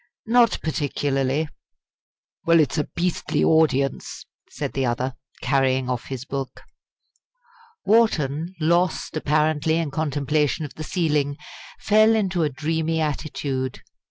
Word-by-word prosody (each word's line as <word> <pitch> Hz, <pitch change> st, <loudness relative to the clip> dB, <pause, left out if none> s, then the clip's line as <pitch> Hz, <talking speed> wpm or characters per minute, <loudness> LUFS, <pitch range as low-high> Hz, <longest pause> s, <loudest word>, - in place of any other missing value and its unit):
"Not 235 Hz, 0 st, +4 dB
particularly." 145 Hz, -1 st, -1 dB, 1.0 s
"Well, 165 Hz, 0 st, +5 dB
it's 155 Hz, +1 st, +2 dB
a 150 Hz, -, 0 dB
beastly 170 Hz, -3 st, -1 dB
audience!" 140 Hz, -4 st, +1 dB, 0.2 s
said -, -, -5 dB
the 135 Hz, -, -1 dB
other, 125 Hz, +1 st, -1 dB, 0.3 s
carrying 130 Hz, -2 st, +1 dB
off 125 Hz, -1 st, -3 dB
his 130 Hz, -1 st, -6 dB
book. 135 Hz, -1 st, -5 dB, 1.2 s
Wharton, 175 Hz, -7 st, +2 dB
lost 170 Hz, +2 st, +1 dB
apparently 155 Hz, +1 st, +1 dB
in 165 Hz, -4 st, -2 dB
contemplation 150 Hz, +1 st, 0 dB
of 145 Hz, -, -9 dB
the 155 Hz, -, -7 dB
ceiling, 150 Hz, -4 st, 0 dB, 0.4 s
fell 215 Hz, +1 st, +4 dB
into 190 Hz, -5 st, 0 dB
a 155 Hz, -, +2 dB
dreamy 160 Hz, +3 st, -1 dB
attitude. 140 Hz, -4 st, -3 dB
150 Hz, 115 wpm, -23 LUFS, 135-165 Hz, 1.2 s, Well